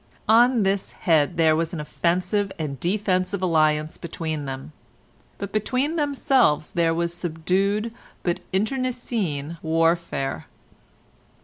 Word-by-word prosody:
On 235 Hz, +1 st, +5 dB
this 195 Hz, 0 st, -1 dB
head 165 Hz, 0 st, +2 dB
there 160 Hz, -1 st, +4 dB
was 165 Hz, +1 st, -1 dB
an -, -, -4 dB
offensive 180 Hz, +6 st, 0 dB
and 145 Hz, -4 st, -4 dB
defensive 185 Hz, +1 st, 0 dB
alliance 155 Hz, -3 st, +2 dB
between 160 Hz, -3 st, -4 dB
them, 135 Hz, +2 st, -6 dB, 0.7 s
but 200 Hz, -1 st, -5 dB
between 255 Hz, +8 st, 0 dB
themselves 270 Hz, -, +2 dB
there 170 Hz, -1 st, +2 dB
was 170 Hz, +1 st, -1 dB
subdued 190 Hz, +6 st, -1 dB, 0.3 s
but 175 Hz, -1 st, 0 dB
internecine 210 Hz, -, -2 dB
warfare. 165 Hz, -, 0 dB
175 Hz, 110 wpm, -24 LUFS, 160-210 Hz, 0.7 s, On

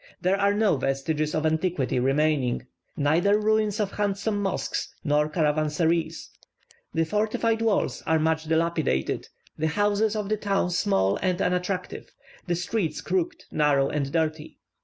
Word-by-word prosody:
There 195 Hz, +2 st, +1 dB
are 200 Hz, 0 st, +3 dB
no 210 Hz, -7 st, +3 dB
vestiges 140 Hz, +3 st, -1 dB
of 155 Hz, -, 0 dB
antiquity 160 Hz, -5 st, 0 dB
remaining; 135 Hz, -1 st, +1 dB, 0.3 s
neither 165 Hz, +8 st, +3 dB
ruins 215 Hz, 0 st, +1 dB
of 205 Hz, -2 st, 0 dB
handsome 205 Hz, +1 st, -1 dB
mosques 195 Hz, -1 st, -2 dB
nor 150 Hz, -1 st, +2 dB
caravansaries. 160 Hz, +2 st, 0 dB, 0.6 s
The 165 Hz, 0 st, +1 dB
fortified 220 Hz, +4 st, 0 dB
walls 210 Hz, -, +1 dB
are 160 Hz, -, +3 dB
much 160 Hz, 0 st, 0 dB
dilapidated, 160 Hz, -, 0 dB, 0.3 s
the 160 Hz, -, +1 dB
houses 205 Hz, +5 st, +1 dB
of 210 Hz, -2 st, -2 dB
the 215 Hz, +1 st, 0 dB
town 195 Hz, -3 st, 0 dB
small 100 Hz, -, +1 dB
and 185 Hz, -1 st, -1 dB
unattractive, 180 Hz, 0 st, -2 dB, 0.3 s
the 175 Hz, -, +1 dB
streets 180 Hz, 0 st, -2 dB
crooked, 340 Hz, -3 st, -2 dB
narrow, 145 Hz, -2 st, +2 dB
and 140 Hz, -2 st, -2 dB
dirty. 155 Hz, -1 st, -2 dB
170 Hz, 135 wpm, -26 LUFS, 150-205 Hz, 0.6 s, are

